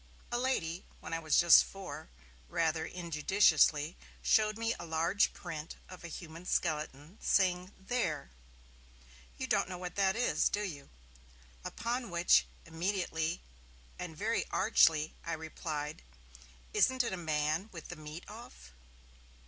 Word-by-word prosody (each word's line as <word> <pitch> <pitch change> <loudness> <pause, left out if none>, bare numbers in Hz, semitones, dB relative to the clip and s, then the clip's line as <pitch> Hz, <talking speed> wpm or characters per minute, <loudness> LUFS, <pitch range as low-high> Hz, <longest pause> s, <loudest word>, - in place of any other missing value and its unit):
A 240 - +1
lady 185 -10 -1 0.2
when - - -7
I 165 - 0
was 155 -1 +3
just 170 -1 +8
four 195 - -8 0.4
rather 160 -1 0
injudiciously 165 -2 +3 0.3
showed 215 0 +3
me 230 0 0
a - - -6
large 165 +5 +2
print 155 0 -7
of 185 -1 -11
a - - -5
human 165 +1 -9
skeleton, 155 +1 -2
saying, 185 -1 +2
'There! 190 - -2 1.1
you - - -2
don't - - +1
know 180 - -5
what 180 -1 -6
that 195 -1 +3
is, 245 +2 +2
do 210 - -1
you?' 145 -8 -6 0.7
Upon 235 +1 -3
which, 170 0 +4 0.2
immediately 170 -1 -2 0.6
and 165 -3 -6
very 220 +4 0
archly, 160 -7 +4
I 165 - -3
replied, 155 -1 -5 0.7
'Isn't 260 -1 +3
it 230 - -2
a 175 -3 -6 0.2
man 160 +8 -1
with 165 -3 -9
the 175 - -5
meat 155 +1 -8
off?' - - -11
170 Hz, 135 wpm, -33 LUFS, 160-195 Hz, 1.1 s, just